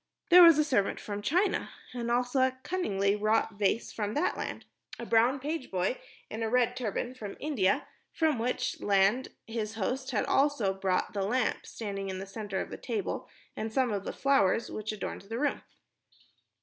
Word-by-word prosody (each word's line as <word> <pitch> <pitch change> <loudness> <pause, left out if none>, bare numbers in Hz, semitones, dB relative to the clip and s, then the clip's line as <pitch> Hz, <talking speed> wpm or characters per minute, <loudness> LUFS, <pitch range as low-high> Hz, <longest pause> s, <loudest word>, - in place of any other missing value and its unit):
There 360 +1 +10
was 335 -3 +9
a 305 - +4
servant 250 -10 +1
from 205 -1 -5
China 360 - +1 0.2
and 235 -1 -3
also 245 +2 +1
a 260 0 +2
cunningly 200 - 0
wrought 215 +1 +1
vase 210 +3 +1
from 210 -1 -3
that 295 - +1
land; - - -5 0.3
a 235 - -6
brown 235 +4 +3
page 300 +1 -4
boy 185 +6 -1 0.3
in 220 - -6
a 225 - 0
red 245 0 +2
turban 245 0 -3
from 210 -6 -8
India 240 -11 +1 0.3
from 315 -6 +1
which 245 +2 -1
land 200 +6 +3 0.2
his 225 -1 -4
host 255 +6 -2
had 225 -6 0
also 270 -9 +2
brought 190 -1 -1
the 200 - -1
lamp 240 +7 0
standing 195 -3 -5
in 190 - -4
the 190 - -5
center 195 -1 -4
of - - -6
the - - -5
table 420 -3 -3 0.3
and 220 0 -4
some 250 -1 +1
of 200 -1 -2
the - - -4
flowers 235 -6 +2
which 215 0 -4
adorned 215 - -5
the 225 +4 -6
room. 290 +2 0
225 Hz, 185 wpm, -30 LUFS, 205-260 Hz, 0.3 s, There